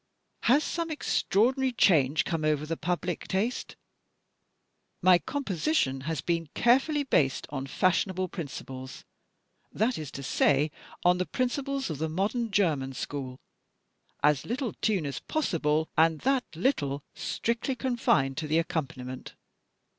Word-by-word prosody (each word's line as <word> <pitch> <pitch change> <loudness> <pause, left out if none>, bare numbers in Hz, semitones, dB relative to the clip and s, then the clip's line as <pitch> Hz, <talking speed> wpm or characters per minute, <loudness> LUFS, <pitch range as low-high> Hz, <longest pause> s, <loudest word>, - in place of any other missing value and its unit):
Has 280 +6 +5
some 335 -1 -2
extraordinary 260 -3 +1
change 155 - +3
come 165 -3 -2
over 150 -1 +1
the 165 +2 -2
public 175 0 -2
taste? 210 +6 -2 1.3
My 180 -1 +7
composition 200 - -1
has 160 -5 -1
been 165 -1 -1
carefully 270 +5 +3
based 140 - +1
on 135 -2 -4
fashionable 185 +4 +1
principles 130 -5 -7 0.7
that 225 +2 0
is 155 -3 -5
to 140 - -6
say, 145 +3 +2 0.3
on 180 0 +5
the 185 - -1
principles 270 - -1
of 145 - -5
the 160 0 -1
modern 210 +8 -1
German 155 -10 +1
school. 130 -1 -5 0.9
As 150 -2 +4
little 245 +1 -3
tune 200 -8 +1
as 140 - -3
possible; 160 - 0
and 160 0 +3
that 265 -1 +2
little 145 - 0
strictly 235 +3 -2
confined 235 - +1
to 155 - -2
the 155 +2 +2
accompaniment. 135 -7 -3
175 Hz, 130 wpm, -28 LUFS, 150-240 Hz, 1.3 s, My